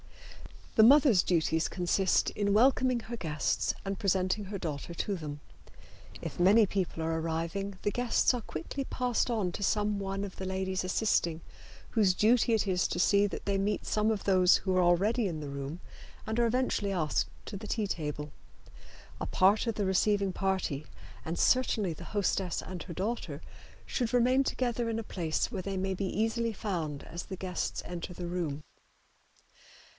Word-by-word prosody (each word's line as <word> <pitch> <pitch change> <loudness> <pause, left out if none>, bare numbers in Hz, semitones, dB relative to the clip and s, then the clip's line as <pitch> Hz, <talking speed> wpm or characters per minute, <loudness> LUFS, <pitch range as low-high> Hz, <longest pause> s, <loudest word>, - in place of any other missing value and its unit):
The 220 - +8
mother's 265 - +7
duties 160 -2 +1
consist 180 +2 +1
in 200 -1 0
welcoming 255 +1 +3
her 235 +1 -6
guests 155 -6 -1
and 195 -1 -3
presenting 190 +1 +1
her 200 +1 -5
daughter 160 -2 -5
to 200 +4 -2
them. 150 -4 -6 0.8
If - - -6
many 205 +5 +6
people 185 -4 -2
are 160 0 0
arriving 165 +5 -3
the 205 - +1
guests 245 +2 +2
are 245 - -2
quickly 215 - -5
passed 250 -2 0
on 210 -7 0
to 185 - -7
some 210 0 +1
one 195 0 -3
of 195 -2 -7
the 190 - -5
ladies 190 0 -2
assisting, 175 -4 +1 0.5
whose 205 -5 +3
duty 230 +3 +3
it 215 - +1
is 185 -1 +1
to 175 - -3
see 200 +2 +4
that - - -7
they 200 -1 +1
meet 205 +1 -1
some 215 +1 +1
of 215 -3 -1
those 185 -2 +5
who 190 -2 -1
are 185 - +4
already 200 +6 +3
in 165 -4 -4
the 145 - -5
room 140 +4 -6 0.4
and 220 +1 -2
are 235 - +4
eventually 230 -4 0
asked 155 -5 0 0.2
to 200 - -6
the 215 +2 -8
tea 220 -1 -1
table. 150 -5 -4 0.9
A - - -3
part 200 +5 +3
of 230 - 0
the 205 - -1
receiving 195 +1 +2
party, 190 -7 -1 0.4
and 165 +2 -3
certainly 220 -8 +2
the - - -10
hostess 195 -3 -1
and 180 -2 -7
her 175 - -8
daughter, 215 +8 -3 0.4
should 245 -2 -2
remain 255 +3 +4
together 240 -2 -1
in 225 - -1
a 225 - -3
place 170 -1 -2
where 195 -5 -3
they 195 +1 -4
may 190 +1 -1
be 195 +1 -2
easily 225 +3 0
found 165 -9 -3
as 170 +1 -7
the 190 - -7
guests 185 -1 -3
enter 175 +1 -6
the 175 - -5
room. 165 -4 -3
195 Hz, 180 wpm, -30 LUFS, 175-220 Hz, 0.9 s, The